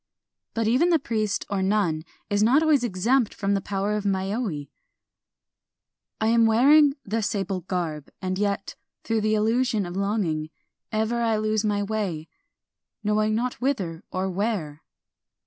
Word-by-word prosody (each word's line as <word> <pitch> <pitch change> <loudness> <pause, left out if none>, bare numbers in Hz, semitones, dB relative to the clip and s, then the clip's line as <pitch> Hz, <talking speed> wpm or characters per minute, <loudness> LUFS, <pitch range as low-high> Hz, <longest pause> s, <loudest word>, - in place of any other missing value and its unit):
But 225 -1 0
even 260 +10 +3
the 335 - +5
priest 220 -7 -2
or 200 -1 -1
nun 190 -5 +1 0.2
is 205 0 0
not 255 +8 +5
always 300 -5 +3
ex 185 -5 -3
empt 250 -2 +3
from 200 -1 0
tlie 195 - 0
power 200 +1 -1
of 210 -1 -1
mayoi: 195 - -2 0.7
— - - -63
I 220 - 0
am 230 0 +4
wearing 280 +6 +5
the 225 +3 -1
sable 195 -3 -1
garb, 165 -5 -3
— - - -58
and 185 0 -3
yet, 200 -1 -1 0.3
through 225 -1 0
illusion 215 +1 +1
of 175 0 -6
longing, 190 -6 -1 0.4
Ever 220 +2 0
I 225 -2 +2
lose 215 0 0
my 205 -1 0
way, 200 -7 -3 0.4
— - - -61
knowing 215 +1 +1
not 245 +2 -2
whither 190 -12 -1
or 185 +1 -1
where 185 -6 -2
210 Hz, 160 wpm, -25 LUFS, 190-230 Hz, 0.7 s, the